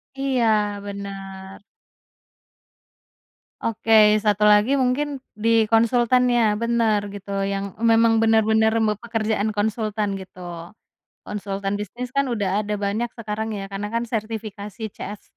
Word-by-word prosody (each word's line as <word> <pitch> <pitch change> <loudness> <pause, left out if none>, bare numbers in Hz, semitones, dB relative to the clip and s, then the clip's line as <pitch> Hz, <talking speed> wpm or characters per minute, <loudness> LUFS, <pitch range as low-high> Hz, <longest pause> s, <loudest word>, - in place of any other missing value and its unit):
Iya, 220 -7 +1
bener. 195 -1 -8 2.0
Oke, 215 -1 +4
1 210 0 +2
lagi 210 +6 +5
mungkin 275 +2 0 0.2
di 225 +1 +2
konsultan 240 +3 +3
ya, 230 -3 +3
bener, 225 -3 +1
gitu. 200 0 -5
Yang 195 -1 -3
memang 225 -1 +4
bener-bener 220 0 +4
me 220 -2 +2
pekerjaan 220 -1 -2
konsultan, 210 -1 -1
gitu. 180 -3 -8 0.6
Konsultan 200 -1 -4
bisnis 240 +5 -6
kan 275 0 +2
udah 205 -3 0
ada 210 - -2
banyak 210 +4 -1
sekarang 220 0 -4
ya, 195 - -5
karena 200 +1 -4
kan 230 - 0
sertifikasi 215 -2 -5
CF 205 0 -7
215 Hz, 115 wpm, -23 LUFS, 200-230 Hz, 2.0 s, lagi